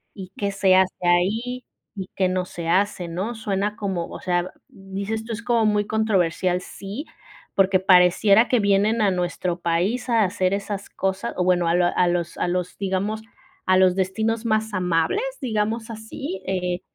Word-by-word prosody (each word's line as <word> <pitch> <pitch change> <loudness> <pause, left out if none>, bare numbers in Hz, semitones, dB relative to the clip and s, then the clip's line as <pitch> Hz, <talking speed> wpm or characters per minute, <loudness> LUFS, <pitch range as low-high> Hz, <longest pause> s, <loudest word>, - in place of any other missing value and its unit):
y 190 -2 -9
qué 200 -1 -1
se 195 -1 +3
hace 190 0 +3
ahí 220 +9 +1 0.3
y 190 -2 -6
qué 190 - +2
no 185 0 -1
se 170 -2 -7
hace, 190 0 +1
¿no? 185 +8 -3
Suena 205 -1 -2
como, 190 -5 -3
o - - -9
sea, 175 0 -1 0.2
dices 195 +3 -5
tú, 230 - -4
es 220 - -5
como 235 -2 +2
muy 210 -1 +2
controversial. 185 -4 +1
Sí, 205 - -7 0.5
porque 190 -1 +4
pareciera 190 +4 +5
que 250 - +3
vienen 205 +2 +2
a 205 - +4
nuestro 180 -1 -2
país 180 +10 0
a 230 -2 +4
hacer 185 -1 0
esas 200 0 -4
cosas, 195 +4 -2
o 180 - +1
bueno, 180 -1 +2
a 165 - +2
lo 175 0 +3
a 180 - +2
los 175 -1 -1
a - - 0
los, 180 0 -2
digamos 200 +3 -2 0.4
a 185 0 +4
los 185 -1 +4
destinos 220 +5 -1
más 220 -1 0
amables, 180 - +1 0.2
digamos 220 -2 -1
así, 220 -1 -6
eh 180 -1 -1
195 Hz, 175 wpm, -23 LUFS, 180-220 Hz, 0.5 s, pareciera